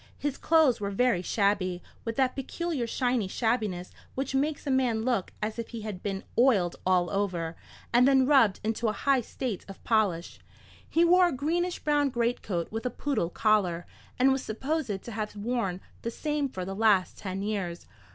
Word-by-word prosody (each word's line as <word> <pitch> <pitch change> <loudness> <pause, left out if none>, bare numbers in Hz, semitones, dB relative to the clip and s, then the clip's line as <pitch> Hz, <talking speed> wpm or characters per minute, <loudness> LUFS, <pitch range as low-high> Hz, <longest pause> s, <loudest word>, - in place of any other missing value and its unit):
His 290 -2 -2
clothes 315 -8 +4
were 200 - -1
very 230 -2 +2
shabby, 185 -2 0 0.2
with 230 -1 -2
that 260 -2 +1
peculiar 280 -1 -3
shiny 245 -4 0
shabbiness 215 -5 -1 0.2
which 270 +1 -2
makes 290 +3 0
a 280 - 0
man 245 -4 +2
look 240 -7 0
as 215 +2 -3
if 230 - -3
he 230 -2 -7
had 210 -4 -6
been 195 -1 -3 0.2
oiled 205 -9 +4
all 180 -1 +3
over, 180 -5 -1 0.4
and 245 +2 +6
then 265 -1 +5
rubbed 255 -9 +4
into 225 +1 -1
a 215 - +1
high 275 +1 +2
state 235 -3 -4
of 195 - -11
polish. 200 -7 0 0.5
He 335 +1 +4
wore 360 +1 +6
a - - -1
greenish 340 +6 -1
brown 290 -1 +2
greatcoat 235 -8 -1
with 225 +3 -2
a - - 0
poodle 240 -8 -1
collar, 185 -4 +1 0.3
and 260 +2 +5
was 265 0 +1
supposed 250 -3 -2
to 235 - -7
have 215 -1 -4
worn 205 -4 -2 0.2
the 230 - -2
same 295 +2 -2
for 185 -7 -5
the 195 - -4
last 205 -3 +3
ten 195 0 -4
years. 195 -5 -3
225 Hz, 180 wpm, -28 LUFS, 195-265 Hz, 0.5 s, and